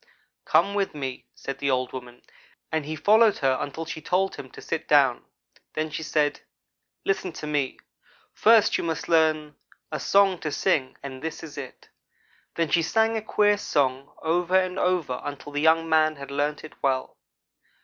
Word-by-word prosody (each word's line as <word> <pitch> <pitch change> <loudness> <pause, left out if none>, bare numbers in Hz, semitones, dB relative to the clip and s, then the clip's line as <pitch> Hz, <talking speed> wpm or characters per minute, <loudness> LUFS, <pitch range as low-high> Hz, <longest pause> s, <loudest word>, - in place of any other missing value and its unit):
"'Come 200 - +3
with 200 -5 -1
me,' 135 -3 -5
said 135 0 -6
the 140 - 0
old 130 -1 0
woman, 125 -1 -9 0.5
and 160 -2 -1
he 155 - -3
followed 215 +6 +4
her 135 -2 +2
until 160 +3 -4
she 160 -1 -6
told 190 +3 0
him 130 - -9
to - - -13
sit 165 -1 -4
down. 140 -5 +4 0.5
Then 155 0 -2
she 160 - -4
said: 150 -2 0 0.6
'Listen 190 -2 0
to - - -7
me. 145 -3 -1 0.6
First 220 -1 +5
you - - -2
must 165 -2 -3
learn 155 -2 +2 0.3
a 155 - -3
song 195 +4 +3
to 155 - -3
sing, 145 -6 0
and 130 -2 -7
this 160 0 -5
is 155 -2 -9
it.' 140 -3 -9 0.7
Then 165 -2 0
she 170 - +4
sang 220 +7 +2
a 220 - -1
queer 205 -1 +2
song 135 -5 0
over 175 +3 +1
and 185 0 -2
over 180 -7 +1
again 125 - -6
until 145 +1 -11
the 145 0 -2
young 165 +1 +4
man 155 -1 +3
had 140 -1 -9
learned 145 +1 -1
it 155 - -10
well. 130 -1 0
155 Hz, 180 wpm, -25 LUFS, 140-180 Hz, 0.7 s, First